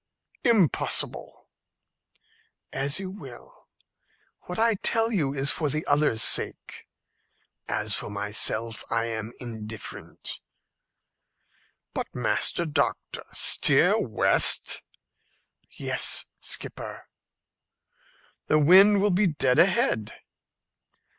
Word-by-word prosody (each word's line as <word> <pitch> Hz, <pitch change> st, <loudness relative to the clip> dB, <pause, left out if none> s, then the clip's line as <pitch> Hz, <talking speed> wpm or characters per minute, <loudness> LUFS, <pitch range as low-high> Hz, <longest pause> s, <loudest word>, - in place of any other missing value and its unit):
"Impossible." 220 Hz, -, +1 dB, 1.3 s
"As 140 Hz, +2 st, 0 dB
you 190 Hz, -1 st, -6 dB
will. 140 Hz, -11 st, -13 dB, 0.8 s
What 180 Hz, -, -6 dB
I 225 Hz, +1 st, +3 dB
tell 225 Hz, +3 st, 0 dB
you 155 Hz, -11 st, 0 dB
is 140 Hz, 0 st, +1 dB
for 155 Hz, -3 st, -1 dB
the 155 Hz, +3 st, -2 dB
others' 145 Hz, -7 st, +2 dB
sake. -, -, +1 dB, 0.8 s
As -, -, 0 dB
for -, -, -4 dB
myself, 110 Hz, +2 st, 0 dB
I 115 Hz, 0 st, +1 dB
am 110 Hz, -1 st, -5 dB
indifferent." 110 Hz, -3 st, -7 dB, 1.5 s
"But, -, -, -6 dB
Master 170 Hz, -, 0 dB
Doctor, 145 Hz, -2 st, -2 dB
steer -, -, +4 dB
west?" -, -, +1 dB, 1.0 s
"Yes, -, -, 0 dB
skipper." -, -, -6 dB, 1.4 s
"The 155 Hz, -, +3 dB
wind 195 Hz, +6 st, +5 dB
will 205 Hz, -, +2 dB
be 190 Hz, +3 st, +2 dB
dead 145 Hz, -4 st, +1 dB
ahead." 170 Hz, -, +1 dB
145 Hz, 90 wpm, -25 LUFS, 115-190 Hz, 1.5 s, wind